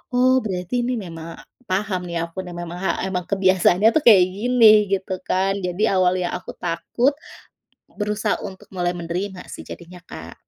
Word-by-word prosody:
oh 255 +1 +4
berarti 185 +5 -2
ini 250 - -1
memang, 165 -5 -7 0.3
paham 190 -1 -1
nih 170 -1 -3
aku 185 +3 -7
dan 175 -1 -8
memang 175 0 -6
ha 190 - -1 0.2
emang 180 -2 -2
kebiasaannya 190 +1 +4
tuh 310 - +2
kayak 200 -6 +8
gini, 215 -3 +5
gitu 190 0 -5
kan? 190 +1 +1
Jadi 180 +4 -2
awalnya 185 -1 +2
aku - - -9
takut, 180 +11 0 0.9
berusaha 210 +1 -1
untuk 190 -2 -9
mulai 175 0 0
menerima 180 +3 -4
sih - - -8
jadinya, 180 +1 -11
Kak. - - -10
190 Hz, 160 wpm, -22 LUFS, 180-210 Hz, 0.9 s, kayak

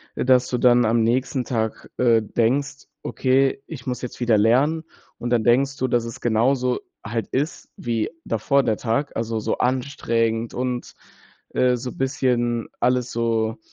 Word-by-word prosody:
äh, - - -2
dass 125 -1 +4
du 125 - 0
dann 120 -1 +5
am 115 +1 +2
nächsten 125 +2 0
Tag, 110 -3 -3
äh, 115 -2 +4
denkst, 135 +6 -1 0.2
okay, 135 +1 +1
ich 140 -6 -9
muss 125 -1 -3
jetzt 125 - -7
wieder 120 -3 +3
lernen. 135 +9 +3 0.4
Und 120 - -3
dann 115 -2 +2
denkst 135 +3 +2
du, 130 - 0
dass 120 -1 +1
es 115 - -7
genauso 125 +2 +1 0.3
halt 115 +2 -3
ist 145 +5 -3
wie 115 -3 -1 0.2
davor 135 +5 +1
der 110 -4 0
Tag, 125 +5 -1
also 115 0 -2
so 110 - -2
anstrengend 115 -3 0
und, 125 -1 -3 0.5
äh, 125 -1 +2
so 125 +1 -5
bisschen 120 -3 0
alles 125 0 +1
so 115 -1 0
120 Hz, 160 wpm, -23 LUFS, 115-130 Hz, 0.5 s, dann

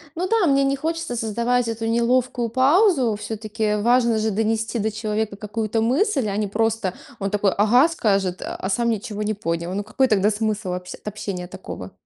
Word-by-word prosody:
Ну 360 +3 -1
да, 445 -4 +3
мне 275 -1 +3
не 275 0 +2
хочется 320 -3 -3
создавать 235 +2 0
эту 225 0 -3
неловкую 240 +1 +1
паузу. 270 - +3
Всё-таки 215 0 -2
важно 235 +1 +3
же 220 0 0
донести 225 +2 -1
до 220 +1 0
человека 215 -1 -2
какую-то 220 +1 -2
мысль, 265 - +1
а 200 0 -2
не 210 - 0
просто 220 -2 0 0.3
он 195 0 -1
такой: 205 -2 +1
"Ага"- 245 +9 +5
скажет, 195 - 0
а 190 - -4
сам 235 +4 +1
ничего 215 -1 -3
не 215 - 0
понял. 170 -3 -3
Ну, 205 - -2
какой 260 +5 +1
тогда 210 -2 +3
смысл 210 -2 -2
в 180 - -1
общ 180 0 -6
от - - -18
общения 200 -4 -4
такого? 135 - -8
220 Hz, 190 wpm, -22 LUFS, 205-245 Hz, 0.3 s, Ага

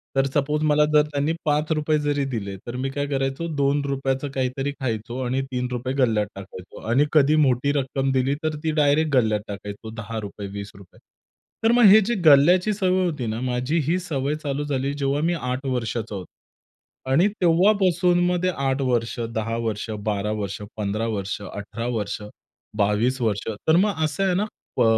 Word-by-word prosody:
तर 135 0 +3
सपोज 150 +1 0
मला 150 0 +4
जर 150 - +7
त्यांनी 145 +3 0
₹5 155 +1 +1
जरी 145 -1 0
दिले, 100 -4 -4
तर 120 - -5
मी 135 +1 -2
काय 145 +1 -2
करायचो 135 +3 -2
₹2 140 -1 0
चं 145 +1 -5
काहीतरी 135 +1 -2
खायचो 120 0 -3
आणि 130 +2 0
₹3 125 0 -2
गल्ल्यात 110 -5 +2
टाकायचो. 95 -1 -10
आणि 135 +5 +4
कधी 150 0 +5
मोठी 130 +2 +2
रक्कम 135 0 -1
दिली, 135 +2 +1
तर 155 -1 -1
ती 160 - +1
डायरेक्ट 145 +1 +3
गल्ल्यात 110 -4 +2
टाकायचो 100 +2 -7
₹10, 105 -2 -6
₹20. 100 -1 -10 0.6
तर 225 - +5
मग 240 0 +4
हे 215 - +9
जी 235 +5 -1
गल्ल्याची 175 +8 +6
सवय 185 -2 +1
होती 150 -8 -2
ना, 110 +1 -3
माझी 125 +5 -1
ही 175 +3 +2
सवय 150 -5 -2
चालू 145 0 -2
झाली 140 -1 -1
जेव्हा 140 0 -1
मी - - +1
8 125 +2 -3
वर्षाचा 115 -4 -2
होतो 95 -2 -6 0.9
आणि 170 +9 +5
तेव्हापासून 180 0 +3
मग 180 0 0
ते 185 - +3
8 135 -4 -1
वर्ष, 120 -2 0 0.2
10 115 +1 -1
वर्ष, 110 -1 -3 0.2
12 105 0 -1
वर्ष, 100 +1 -4 0.2
15 105 +2 -1
वर्ष, 100 -2 -3
18 105 +4 -6
वर्ष, 100 0 -3 0.6
22 105 +6 +1
वर्ष, 105 -2 -1 0.2
तर 160 - +5
मग 185 -4 +2
असं 155 +5 -1
आहे 185 - +2
ना, 205 +3 +1 0.3
ब - - +4
135 Hz, 175 wpm, -23 LUFS, 115-150 Hz, 0.9 s, हे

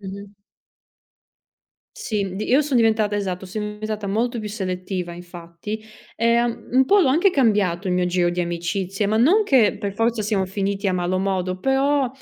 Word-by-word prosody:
Mh-mh. 200 +1 -9 1.7
Sì, 215 - -2
mhmm, 190 -1 -5
di 210 - -3
io 265 +4 +4
son 285 -3 0
diventata 220 -2 +2
esatto, 190 -2 -3
son 210 +4 -4 0.2
diventata 215 -1 -4
molto 230 +5 -1
più 215 - -5
selettiva 185 -3 -4
infatti, 175 +4 -8 0.3
e 235 +1 +3
un 240 -1 -4
un 265 +1 +5
po' 405 +8 +5
l'ho 345 - +4
anche 335 +9 +3
cambiato 205 - +1
il 180 - +1
mio 180 0 +1
giro 180 0 +1
di 175 +1 -3
amicizie, 175 +4 -2
ma 215 +2 +1
non 325 - +5
che 250 - +3
per 200 -3 -3
forza 225 0 0
siamo 205 -2 0
finiti 195 +1 -2
a 190 - +1
malo 180 +1 0
modo, 185 -1 -1
però 270 +3 +2
205 Hz, 180 wpm, -22 LUFS, 185-235 Hz, 1.7 s, un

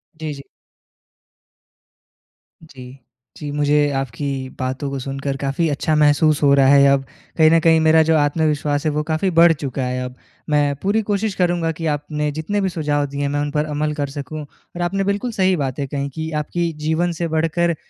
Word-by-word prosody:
जी, 155 -1 -5
जी। 140 0 -10 2.2
जी। 130 -4 -12 0.4
जी, 150 -2 -6
मुझे 145 0 +2
आपकी 135 +1 -3 0.3
बातों 130 +2 -3
को 135 -1 -4
सुनकर 135 +1 -4
काफ़ी 140 +5 -1
अच्छा 150 +2 0
महसूस 150 0 +3
हो 140 - +5
रहा 135 -1 +5
है 140 0 +6
अब। 140 -1 +2 0.3
कहीं 155 -1 +6
न 165 - +5
कहीं 160 0 +4
मेरा 160 0 +5
जो 160 0 +2
आत्मविश्वास 145 0 0
है 155 - +2
वो 150 +1 -1
काफ़ी 160 +5 +1
बढ़ 170 0 +6
चुका 140 -3 -4
है 125 0 -2
अब। 125 0 -7 0.3
मैं 145 -1 +2
पूरी 205 +3 +2
कोशिश 205 0 0
करूँगा 175 -2 +1
कि 165 +1 -6
आपने 150 0 -3
जितने 160 +7 -2
भी 190 - 0
सुझाव 145 -4 -1
दिए 140 +1 -5
हैं 140 - 0
मैं 145 +1 -1
उन 145 0 -2
पर 150 +1 0
अमल 150 +1 -1
कर 145 -2 -3
सकूँ। 145 +2 -6
और 160 +4 -11
आपने 195 +3 0
बिल्कुल 200 +5 -1
सही 190 -3 +2
बातें 140 -1 -3
कही 140 0 -3
कि 160 +3 -5
आपकी 170 +2 -2
जीवन 170 +2 +1
से 170 - 0
बढ़कर 165 +1 +1
150 Hz, 190 wpm, -20 LUFS, 140-165 Hz, 2.2 s, है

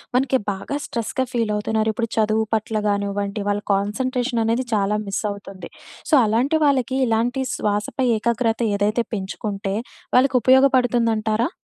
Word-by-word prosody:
మనకి 260 +1 +3
బాగా 200 +8 -5
స్ట్రెస్‌గా 250 +3 -2
ఫీలవుతున్నారు. 220 -1 0
ఇప్పుడు 230 0 -2
చదువు 220 0 +2
పట్ల 220 0 -2
గానివ్వండి, 200 +1 -2
వాళ్ళ 205 0 0
కాన్సంట్రేషననేది 235 +3 0
చాలా 210 0 +1
మిస్సవుతుంది. 200 -1 -5 0.4
సో, - - -1
అలాంటి 250 +9 +1
వాళ్ళకి, 265 -2 +1
ఇలాంటి 240 +4 0
శ్వాసపై 210 +5 -1
ఏకాగ్రత 230 +1 0 0.2
ఏదైతే 210 +4 +1
పెంచుకుంటే, 195 0 -4 0.4
వాళ్ళకుపయోగపడుతుందంటారా? 250 -3 +3
225 Hz, 110 wpm, -22 LUFS, 205-250 Hz, 0.4 s, మనకి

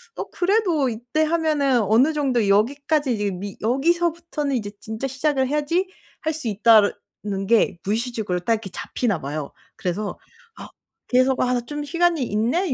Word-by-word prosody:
어 - - -5
그래도 355 - +1
이때 240 +6 -2
하면은 305 -6 +2
어느 230 +10 +4
정도 260 -7 +1
여기까지 275 +7 +2
이제 205 -2 -1
미 195 +1 -6
여기서부터는 320 +3 0
이제 205 -4 -3
진짜 220 +4 -5
시작을 270 0 0
해야지 300 +6 0 0.3
할 315 - -1
수 310 -5 -5
있다는 205 -2 +2
게 220 -4 +3
무의식적으로 220 -3 -1
딱 205 +6 +1
이렇게 220 -3 -3
잡히나 205 -2 -2
봐요. 145 +1 -5 0.3
그래서 200 +3 -3 0.4
아 - - -9 0.4
그래서 255 +1 +3
'아 250 0 +1
나 245 - 0
좀 295 +4 -5
시간이 335 -1 +1
있네. 245 - 0
250 Hz, 340 characters per minute, -23 LUFS, 215-300 Hz, 0.4 s, 어느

